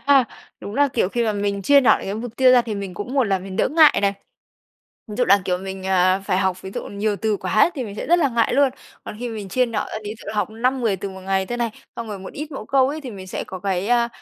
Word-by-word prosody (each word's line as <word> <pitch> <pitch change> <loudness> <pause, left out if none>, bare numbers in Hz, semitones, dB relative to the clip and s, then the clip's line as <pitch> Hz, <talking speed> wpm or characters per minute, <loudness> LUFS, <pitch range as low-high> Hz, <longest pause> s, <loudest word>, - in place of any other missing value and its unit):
ha. 275 -2 +6 0.4
Đúng 205 - -7
là, 285 +2 +3
kiểu, 235 -7 0
khi 235 +3 -1
mà 220 - +1
mình 200 -1 -2
chia 285 +4 +6
nhỏ 255 - +5
cái 195 - -4
mục 230 +1 -6
tiêu 260 -1 +6
ra 245 -1 +6
thì 220 -3 -4
mình 200 -2 -5
cũng 245 +8 -6
một 270 -2 +3
là 195 -3 +1
mình 185 +1 -8
đỡ - - +2
ngại 310 +2 +6
này. 200 0 +3 1.0
Ví 210 - -7
dụ 250 - +2
là, 200 -2 +5
kiểu, 180 -1 0
mình, 190 0 -7
ờ, 185 0 +3
phải 185 - +1
học 190 -1 -1
ví 190 - -7
dụ - - -3
nhiều 205 +1 -1
từ 215 0 0
quá 190 - +2
thì 265 -5 -3
mình 205 -3 -7
sẽ - - -5
rất 345 +1 +4
là 300 -5 +3
ngại 230 -2 +1
luôn. 280 -1 +5 0.4
Còn - - -7
khi 245 +1 -4
mà 230 - -6
mình 205 -3 -6
chia 250 +6 +2
nhỏ 230 -3 -2
ra, - - -3
ví 210 +1 -5
dụ - - -7
học 210 0 0
5, 250 +4 0
10 220 -5 +1
từ 200 +2 -5
một 190 0 -10
ngày 190 0 -1
thôi 240 +3 -4
này, 235 -1 0 0.3
xong 230 -1 -5
rồi 205 -2 -5
một 190 - -9
ít 300 +2 -6
mẫu 270 - -6
câu 265 0 +3
ấy, 305 +3 -4
thì 265 -4 -7
mình 190 -3 -9
sẽ 185 - -4
có 185 - -7
cái, 190 +1 -2
a, 240 -1 +3
215 Hz, 305 wpm, -22 LUFS, 195-250 Hz, 1.0 s, ha